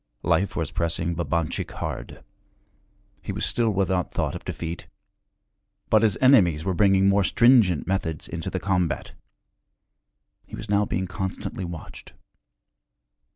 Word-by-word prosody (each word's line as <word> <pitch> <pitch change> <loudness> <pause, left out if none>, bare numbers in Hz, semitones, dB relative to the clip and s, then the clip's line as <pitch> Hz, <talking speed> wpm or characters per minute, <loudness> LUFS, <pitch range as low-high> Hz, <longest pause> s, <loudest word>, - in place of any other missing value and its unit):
Life 100 - +1
was 80 -3 -2
pressing 85 0 -1
Babanchik 85 -1 -2
hard. - - -6 1.0
He - - -5
was - - -1
still 115 -2 +1
without 95 -3 0
thought - - -2
of - - -7
defeat. 85 0 -6 1.0
But 110 - +5
his 110 -5 +2
enemies 90 - +4
were 95 - 0
bringing 95 0 +4
more 100 0 +4
stringent 115 - +4
methods 80 -4 -2
into 85 -2 -5
the 95 - -3
combat; 90 -4 -1 1.4
he - - -8
was - - -8
now 105 0 +3
being 95 +1 -1
constantly 95 +2 -5
watched. 85 -2 -9
95 Hz, 130 wpm, -24 LUFS, 85-100 Hz, 1.4 s, But